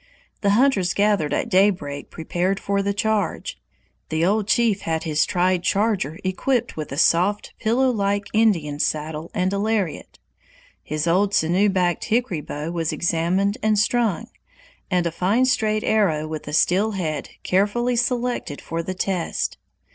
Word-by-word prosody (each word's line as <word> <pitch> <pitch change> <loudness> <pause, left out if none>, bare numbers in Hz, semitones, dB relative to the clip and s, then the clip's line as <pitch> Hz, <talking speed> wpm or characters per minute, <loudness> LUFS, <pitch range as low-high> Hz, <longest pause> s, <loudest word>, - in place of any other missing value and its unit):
The 200 - +2
hunters 245 -9 +2
gathered 200 -8 +2
at - - 0
daybreak 185 -7 +1
prepared 180 +4 -2
for 200 0 -1
the 200 0 0
charge. 205 -1 -2 0.5
The 160 +1 +1
old 205 +2 +1
chief 220 -3 +2
had 160 -1 -2
his 155 -2 +1
tried 180 0 +1
charger 195 -5 0
equipped 235 +6 -1
with 155 -3 -6
a 135 - -5
soft, 185 +6 +2
pillow 250 +4 +2
like 200 -2 0
Indian 175 -10 +2
saddle 155 +1 -2
and 185 0 0
a 200 - -1
lariat. 205 -6 -2 0.6
His 155 +1 -3
old 195 +4 +2
sinew 180 +6 +3
backed 180 -3 0
hickory 230 -8 0
bow 150 +3 -5
was 165 -2 -1
examined 175 +5 0
and 215 -1 +2
strung, 225 0 +1 0.6
and 180 -2 +1
a 170 - 0
fine 200 +9 +1
straight 220 -4 +1
arrow 170 -8 +1
with 155 -1 -6
a 150 - -5
steel 195 +7 +2
head 160 -6 -3
carefully 210 +6 +1
selected 245 - -1
for 165 0 -4
the 185 +3 -5
test. 185 -2 -2
190 Hz, 155 wpm, -22 LUFS, 165-215 Hz, 0.6 s, sinew